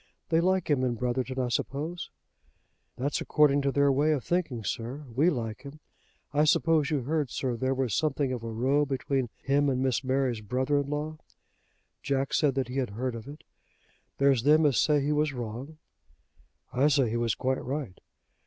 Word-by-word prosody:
They 165 0 +3
like 185 0 +1
him 140 -4 +2
in 125 -2 0
Brotherton, 125 +2 -2
I 125 -1 0
suppose?" 155 +8 -3 0.9
"That's 140 +3 -1
according 145 -2 +3
to 140 0 +1
their 140 0 +3
way 145 +3 +3
of 140 -5 -2
thinking, 160 -10 -1
sir. 125 +8 -4
We 155 +7 +4
like 115 -5 -3
him. 140 +2 -11 0.5
I 150 +1 +3
suppose 155 -1 +3
you 150 -4 0
heard, 150 0 -1
sir, 125 0 -2
there 130 +3 -1
was 130 -5 -1
something 145 -3 0
of 125 - -4
a 115 - -5
row 130 +6 +1
between 135 -2 -1
him 145 +1 +2
and 130 -2 0
Miss 130 0 0
Mary's 130 -3 0
brother 130 +7 0
in 140 -1 -3
law!" 150 +1 -3 0.8
Jack 135 0 -1
said 145 -4 +2
that 135 -3 0
he 125 +2 -5
had 130 -3 0
heard 120 +5 -3
of 115 +1 -8
it. 145 +2 -10 0.7
"There's 140 -3 +3
them 155 +4 +5
as 135 -7 +3
say 150 -1 +3
he 145 - 0
was 150 0 +1
wrong." 125 +5 -6 1.0
"I 130 +4 +3
say 135 -6 +2
he - - -2
was 115 -2 0
quite 130 +1 -1
right." 135 -8 -4
135 Hz, 190 wpm, -28 LUFS, 125-150 Hz, 1.0 s, them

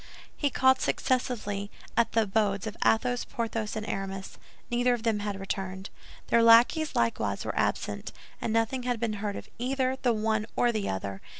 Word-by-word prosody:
He 290 - 0
called 260 0 +4
successively 210 -6 -1 0.3
at 235 - +2
the 225 - +4
abodes 200 -1 0
of 220 -1 -5
Athos, 245 +2 +2
Porthos, 225 -3 -3
and 215 -1 -4
Aramis. 195 0 -5 0.3
Neither 245 +1 +3
of 230 - -8
them 225 -3 +1
had 205 -1 -3
returned. 190 0 -4 0.4
Their 235 - +5
lackeys 235 +8 +5
likewise 115 -1 0
were - - -3
absent, - - -1 0.3
and 225 - -1
nothing 225 +3 +1
had 245 -2 -1
been 225 -1 -1
heard 205 -2 -2
of - - -7
either 260 +1 0
the 245 - +3
one 215 -1 0
or 240 - +3
the 215 -3 -2
other. 95 0 -4
225 Hz, 175 wpm, -28 LUFS, 200-245 Hz, 0.4 s, Their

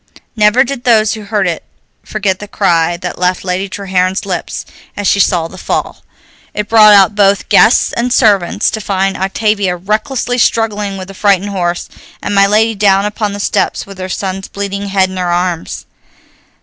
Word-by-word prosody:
Never 215 +3 +4
did 260 -1 -6
those 220 -3 +3
who 215 -2 -8
heard 200 -2 0
it 170 -2 -3 0.4
forget 200 -3 -2
the 210 - -8
cry 175 -4 +1
that 180 0 -6
left 180 0 0
Lady 190 +1 -2
Treherne's 190 0 -1
lips 185 -3 -4 0.3
as 205 - -3
she 200 - +2
saw 175 -4 +2
the 185 +2 -12
fall. - - -3 0.5
It 210 0 -2
brought 215 -2 +7
out 200 +1 +5
both 200 -1 +2
guests 230 - +4
and 245 +1 -1
servants, 205 -8 +2
to 220 - -4
find 195 -1 -1
Octavia 195 -1 0
recklessly 220 +7 -2
struggling 210 -4 0
with 185 -1 -7
the - - -9
frightened 200 0 +1
horse, 175 -3 -2 0.3
and - - -4
my 200 0 +4
lady 220 +2 +2
down 200 -1 +2
upon 210 0 -3
the 205 - -6
stones - - -1
with 195 -1 -12
her 185 0 -5
son's 190 0 -4
bleeding 200 0 -5
head 190 -1 +1
in 190 - -7
her 180 -1 -1
arms. 175 -1 -2
200 Hz, 180 wpm, -13 LUFS, 185-210 Hz, 0.5 s, brought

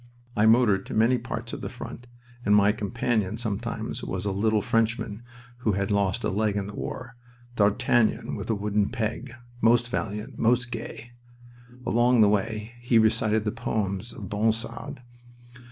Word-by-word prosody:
I 105 +1 +4
motored 110 -4 +4
to - - -5
many 115 +3 +4
parts 115 - -5
of - - -5
the - - -4
front, 125 - -9 0.4
and 105 -2 +4
my 100 0 +5
companion 110 -1 -1
sometimes 110 -4 -3
was 95 +1 -4
a 100 - 0
little 105 +1 +1
Frenchman 115 -1 0 0.4
who 115 -4 0
had 100 +2 -1
lost 100 +2 +1
a - - +1
leg 105 +1 0
in 100 - -1
the 105 - -7
war 125 +3 -6 0.4
D'Artagnan 105 +2 +2
with - - -6
a 110 - +2
wooden 105 0 0
peg, 120 +1 -3 0.3
most 120 +1 +4
valiant, 110 +2 -4
most 120 +1 +2
gay. 115 0 -7 0.7
Along 120 0 +4
the 105 - +6
way 105 +2 -1
he 120 -1 +2
recited 110 -1 +3
the 105 - +1
poems 110 -2 -2
of 100 - -8
Ronsard. 115 +3 -2
110 Hz, 160 wpm, -26 LUFS, 105-120 Hz, 0.7 s, the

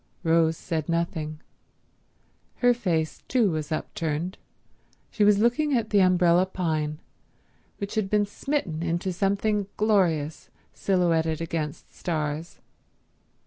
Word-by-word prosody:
Rose 165 -1 +3
said 160 -3 -3
nothing. 160 -2 -2 1.1
Her 245 -1 +4
face 170 -9 -1
too 235 -7 +3
was 155 -1 -3
upturned. 160 +3 -3 0.7
She 215 - +1
was 205 0 +6
looking 245 +6 +2
at 220 -2 -2
the 205 - +5
umbrella 180 0 +4
pine, 155 -5 -2 0.8
which 200 0 -5
had 215 -3 0
been 210 0 +3
smitten 205 - -3
into 175 +2 -1
something 200 +2 0
glorious, 175 -8 +1 0.2
silhouetted 165 -4 +1
against 160 -3 -4
stars. 155 -1 -3
175 Hz, 110 wpm, -26 LUFS, 160-205 Hz, 1.1 s, was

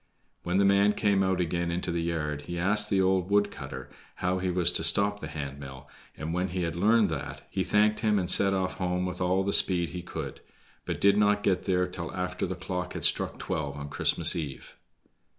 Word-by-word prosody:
When 90 +2 -1
the 100 - +4
man 100 +1 +4
came 100 -2 +2
out 95 -1 +1
again 85 0 -1
into 85 +1 -2
the 85 0 -1
yard 75 -3 -2
he 85 - -3
asked 100 +5 +3
the 95 -1 +2
old 95 -1 +1
wood 100 0 +3
cutter - - -8 0.3
how 90 +1 -1
he 90 0 -1
was 90 -1 +2
to 80 - -1
stop 100 +4 +2
the 80 - -6
hand 70 -2 -6
mill, 65 -2 -10 0.3
and 80 +1 -4
when 90 +1 0
he 90 0 -3
had 85 -1 -2
learned 105 +3 +3
that, 80 -4 -5
he - - 0
thanked 105 +1 +2
him 105 -1 +2
and 90 -3 0
set 95 +2 +4
off 95 -1 -1
home 90 0 -1
with 90 0 -5
all 90 +1 +2
the 100 +1 -1
speed 85 -3 +2
he 90 - -6
could, 85 - -7 0.4
but - - -3
did 100 0 +4
not 105 0 +3
get 95 -2 +1
there 90 -1 +2
until 90 -2 -5
after 90 0 -2
the 95 - -4
clock 90 0 -4
had - - -2
struck - - 0
twelve 70 -3 -3
on 70 0 -6
Christmas - - +2
eve. 75 -5 -6
90 Hz, 220 wpm, -28 LUFS, 85-100 Hz, 0.4 s, the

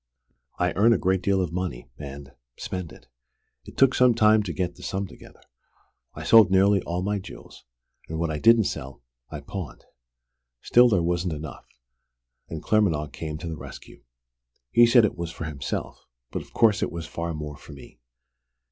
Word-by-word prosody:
I - - 0
earn 115 +4 +4
a - - +2
great 95 0 0
deal 95 0 +1
of 85 - -4
money, 85 -10 -4
and 70 0 -9 0.3
spend 90 -3 -5
it. - - -16 0.6
It - - -13
took 135 -1 +5
some 125 -2 +4
time 110 -1 +5
to 100 -4 -4
get 90 +2 -2
the - - -16
sum 100 0 -3
together. - - -15 0.7
I - - -7
sold 110 -2 +7
nearly 95 +1 +4
all 90 +2 -3
my 100 +1 -1
jewels, 95 - -12 0.4
and 80 - -4
what 85 0 -1
I 75 - -3
didn't 115 +3 +6
sell, 65 -8 -6 0.3
I - - -7
pawned. 95 -6 -8 0.8
Still 120 0 +5
there 95 -6 +2
wasn't 85 0 -1
enough, 75 -3 -8 0.8
and 80 -1 -6
Claremanagh 80 -8 +1
came 75 -2 -6
to 85 +2 -7
the 80 - -4
rescue. - - -12 0.7
He 120 0 +6
said 120 -1 +6
it 95 - -3
was 85 -1 -3
for 85 - -8
himself 75 -3 -5 0.3
but - - -3
of - - -16
course 110 -3 +3
it - - -1
was 85 -1 -6
far 85 -1 -4
more 75 -1 -6
for 70 +1 -13
me! 70 -3 -14
90 Hz, 185 wpm, -25 LUFS, 80-105 Hz, 0.8 s, sold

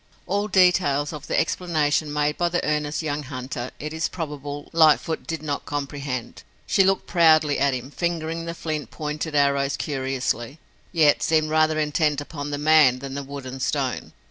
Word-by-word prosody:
All 200 +3 -1
details 180 -7 +3
of 150 -1 -8
the - - +1
explanation 155 -4 0
made 150 0 0
by 175 0 0
the 175 0 -1
earnest 150 +1 -1
young 150 -1 -2
hunter, 130 -2 -5
it 150 +1 -5
is 160 +1 -1
probable, 145 -3 -6
Lightfoot 160 0 +3
did 165 -2 -4
not 145 -2 -3
comprehend. 140 -3 -4 0.2
She 195 - +3
looked 190 0 +1
proudly 155 -4 +4
at 140 -1 +2
him, 130 +2 -7
fingering 165 0 -2
the 170 0 -5
flint 155 -3 -4
pointed 150 0 -4
arrows 140 -1 +2
curiously, 130 -2 -2 0.3
yet 155 -4 +4
seemed 155 -2 +2
rather 155 0 +3
intent 150 -1 +1
upon 145 0 -6
the 145 - -2
man 150 -4 +5
than 135 +1 -7
the 140 - -3
wood 140 -1 -8
and 130 +1 -7
stone. - - -2
150 Hz, 170 wpm, -24 LUFS, 140-160 Hz, 0.3 s, man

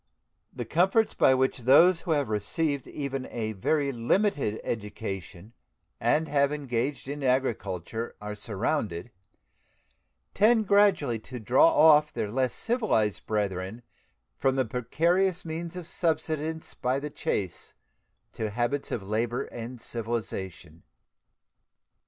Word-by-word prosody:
The - - -5
comforts 190 +7 +2
by 130 - +4
which 130 +1 +1
those 165 +8 +6
who 170 - -3
have 145 -4 +1
received 135 +7 -1
even 135 -2 -4
a 110 -2 -3
very 140 +8 0
limited 130 - 0
education 100 -2 -5 0.5
and 160 +1 +2
have 140 -1 +2
engaged 135 -2 -2
in 145 +1 -5
agriculture 115 -5 -1
are 105 0 -5
surrounded 105 - -2 1.2
tend 220 +1 +4
gradually 190 - +3
to 125 +3 -8
draw 120 +7 +5
off 150 -1 +6
their 105 - -3
less 130 +1 0
civilized 210 - 0
brethren 100 +1 -2 0.6
from 135 0 +2
the 130 -1 +1
precarious 170 - 0
means 165 +1 -5
of 180 -3 -7
subsistence 160 -1 -2
by 130 +2 -1
the 150 +1 -6
chase 95 -9 -3 0.6
to 110 - -3
habits 120 +6 -2
of 105 - -2
labor 115 +6 -1
and 120 0 -8
civilization. 100 -9 -5
130 Hz, 120 wpm, -27 LUFS, 110-155 Hz, 1.2 s, those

